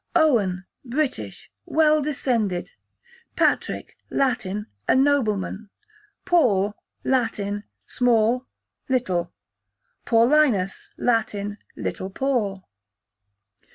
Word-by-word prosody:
Owen, 210 Hz, -, +3 dB, 0.2 s
British, 240 Hz, -, -3 dB, 0.2 s
well 310 Hz, -1 st, +4 dB
descended. 235 Hz, -10 st, -1 dB, 0.6 s
Patrick, -, -, 0 dB
Latin, 220 Hz, -6 st, 0 dB, 0.2 s
a -, -, +4 dB
nobleman. 220 Hz, -7 st, +1 dB, 0.6 s
Paul, 210 Hz, -, +3 dB, 0.3 s
Latin, 210 Hz, -5 st, 0 dB, 0.2 s
small, 245 Hz, +1 st, +2 dB, 0.4 s
little. 185 Hz, -10 st, 0 dB, 0.8 s
Paulinus, 230 Hz, -5 st, +3 dB
Latin, 210 Hz, -3 st, 0 dB, 0.2 s
little 190 Hz, -, -4 dB
Paul. 205 Hz, -5 st, -1 dB
225 Hz, 70 wpm, -24 LUFS, 200-265 Hz, 0.8 s, well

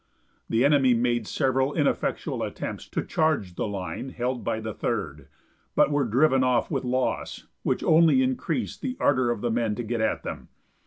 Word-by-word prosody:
The 115 Hz, +4 st, +3 dB
enemy 135 Hz, -4 st, +4 dB
made 120 Hz, -2 st, 0 dB
several 135 Hz, +1 st, 0 dB
ineffectual 150 Hz, -3 st, -1 dB
attempts -, -, -5 dB
to -, -, -2 dB
charge 155 Hz, -, 0 dB
the 90 Hz, -, -2 dB
line 100 Hz, +5 st, -5 dB
held 125 Hz, 0 st, -3 dB
by 110 Hz, -, -1 dB
the 110 Hz, -1 st, -5 dB
Third, -, -, -3 dB, 0.5 s
but -, -, +4 dB
were 145 Hz, -2 st, +2 dB
driven 130 Hz, +3 st, +3 dB
off 125 Hz, -2 st, +1 dB
with -, -, -1 dB
loss, 125 Hz, 0 st, -2 dB, 0.2 s
which -, -, -1 dB
only 155 Hz, -5 st, +5 dB
increased 130 Hz, -, -2 dB
the 255 Hz, -1 st, -3 dB
ardor 130 Hz, -3 st, +2 dB
of 120 Hz, -3 st, -2 dB
the 120 Hz, -, 0 dB
men 115 Hz, -2 st, 0 dB
to 120 Hz, -, -4 dB
get 115 Hz, 0 st, -2 dB
at 110 Hz, -, 0 dB
them. -, -, -6 dB
125 Hz, 175 wpm, -26 LUFS, 115-135 Hz, 0.5 s, only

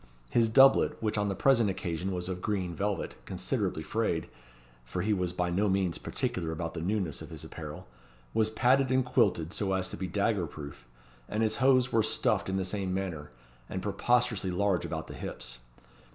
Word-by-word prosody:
His 115 Hz, -1 st, +3 dB
doublet, 135 Hz, +4 st, +6 dB
which 110 Hz, -1 st, -1 dB
on 105 Hz, -1 st, +1 dB
the 100 Hz, -, -1 dB
present 120 Hz, -4 st, +4 dB
occasion 90 Hz, -1 st, -3 dB
was 90 Hz, -1 st, -3 dB
of 90 Hz, -1 st, -4 dB
green 95 Hz, -5 st, -1 dB
velvet, 100 Hz, +3 st, -2 dB
considerably -, -, -1 dB
frayed, -, -, -1 dB, 0.6 s
for 90 Hz, +9 st, -3 dB
he 105 Hz, +1 st, +2 dB
was 90 Hz, -3 st, 0 dB
by 90 Hz, 0 st, -1 dB
no 100 Hz, +4 st, +2 dB
means 95 Hz, -3 st, +1 dB
particular 85 Hz, -3 st, -2 dB
about 80 Hz, 0 st, -4 dB
the 80 Hz, -, -4 dB
newness 95 Hz, -3 st, -1 dB
of -, -, -8 dB
his -, -, -8 dB
apparel, -, -, -8 dB, 0.5 s
was 110 Hz, -1 st, +2 dB
padded 130 Hz, +4 st, +3 dB
and 130 Hz, -1 st, +3 dB
quilted 90 Hz, -8 st, +2 dB
so 95 Hz, -2 st, -1 dB
as 95 Hz, 0 st, 0 dB
to -, -, -5 dB
be 95 Hz, +2 st, -3 dB
dagger 100 Hz, 0 st, 0 dB
proof; 70 Hz, -5 st, -10 dB, 0.4 s
and 110 Hz, +2 st, 0 dB
his 110 Hz, 0 st, +1 dB
hose 130 Hz, -1 st, +4 dB
were 115 Hz, -, +4 dB
stuffed 105 Hz, -, +2 dB
in 95 Hz, -, 0 dB
the 95 Hz, -, -1 dB
same 95 Hz, -1 st, -2 dB
manner, 85 Hz, -6 st, -4 dB, 0.4 s
and -, -, -4 dB
preposterously 120 Hz, -6 st, +1 dB
large 90 Hz, 0 st, +1 dB
about -, -, -4 dB
the -, -, -9 dB
hips. 60 Hz, 0 st, -6 dB
95 Hz, 190 wpm, -30 LUFS, 90-110 Hz, 0.6 s, doublet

